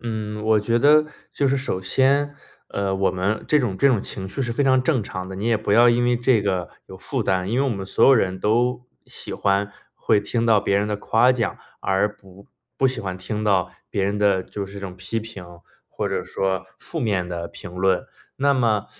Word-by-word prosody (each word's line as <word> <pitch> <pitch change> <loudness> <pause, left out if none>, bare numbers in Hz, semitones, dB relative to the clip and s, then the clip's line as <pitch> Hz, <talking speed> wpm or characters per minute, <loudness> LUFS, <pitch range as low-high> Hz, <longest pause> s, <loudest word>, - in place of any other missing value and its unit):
嗯， 110 -2 -4
我 110 -1 +3
觉 115 +3 +1
得 150 +3 +5 0.3
就 140 - 0
是 140 - +2
首 130 -8 -2
先， 140 +8 +2 0.3
呃， 100 -1 -2
我 95 0 +1
们 95 +4 -2
这 150 - +4
种 115 -8 -1
这 140 - +4
种 120 -7 +2
情 95 -1 -6
绪 135 +7 -3
是 120 -1 -2
非 140 - 0
常 130 -1 +4
正 130 -6 +1
常 95 -2 -6
的， 95 - -7
你 105 +4 -3
也 115 -2 +3
不 105 -1 -2
要 120 +3 +6
因 120 +1 +3
为 120 0 +2
这 120 -3 +2
个 95 -4 -1 0.2
有 95 - -11
负 130 +3 -3
担。 95 -1 0
因 120 - +1
为 140 - +2
我 135 - 0
们 100 -3 -4
所 - - +2
有 135 - +8
人 95 -5 0
都 120 +3 +1 0.2
喜 - - -8
欢， 100 0 0 0.2
会 105 - +2
听 115 +3 -1
到 110 -3 +4
别 100 - +1
人 105 - -1
的 105 - -1
夸 120 +4 +3
奖， 115 -4 -2 0.2
而 100 +2 0
不 100 0 -17 0.3
不 135 - +3
喜 130 -2 -4
欢 95 -4 -4
听 105 +3 -4
到 95 -4 +2 0.2
别 100 - -2
人 100 +1 -1
的 100 -2 +2
就 100 0 -6
是 100 - -13
这 100 - -7
种 95 -2 -7
批 100 +5 -3
评， 110 -5 -9 0.4
或 - - -3
者 - - -2
说 95 -1 -2
负 165 - -6
面 100 -8 0
的 85 -1 -4
评 100 - -10
论。 95 0 +1 0.3
那 140 +1 +3
么， 110 -5 +1
105 Hz, 245 characters per minute, -22 LUFS, 95-120 Hz, 0.4 s, 有